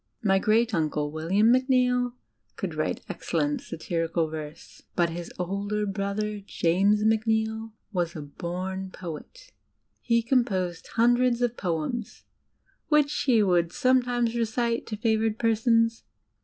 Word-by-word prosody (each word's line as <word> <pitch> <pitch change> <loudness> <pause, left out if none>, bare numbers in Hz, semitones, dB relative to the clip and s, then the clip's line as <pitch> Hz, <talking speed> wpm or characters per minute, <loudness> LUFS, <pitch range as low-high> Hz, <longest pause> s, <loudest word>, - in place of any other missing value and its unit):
My 195 -2 +4
great 225 +3 +2
uncle, 150 -3 0
William 185 +9 +2
Macneill, 250 -1 +2 0.4
could - - -4
write - - -2
excellent 290 -3 -1
satirical 165 0 -2
verse. 155 0 -8
But 170 -1 +2
his 170 +1 -6
older 200 +3 -2
brother, 200 +1 -2
James 200 +2 +2
Macneill, 220 0 +1 0.2
was 175 -2 -1
a 155 - -5
bom 185 +5 -5
poet. 185 - -9 0.5
He 235 -1 +2
composed 190 -9 0
hundreds 240 +1 +3
of 240 -1 0
poems, 180 +6 -3 0.6
which 300 -1 +3
he 235 -6 +3
would 175 -3 +2
somedmes 245 - +1
recite 235 0 -1
to 215 - -4
favoured 220 -1 +1
persons. 230 0 +2
215 Hz, 120 wpm, -26 LUFS, 180-235 Hz, 0.6 s, My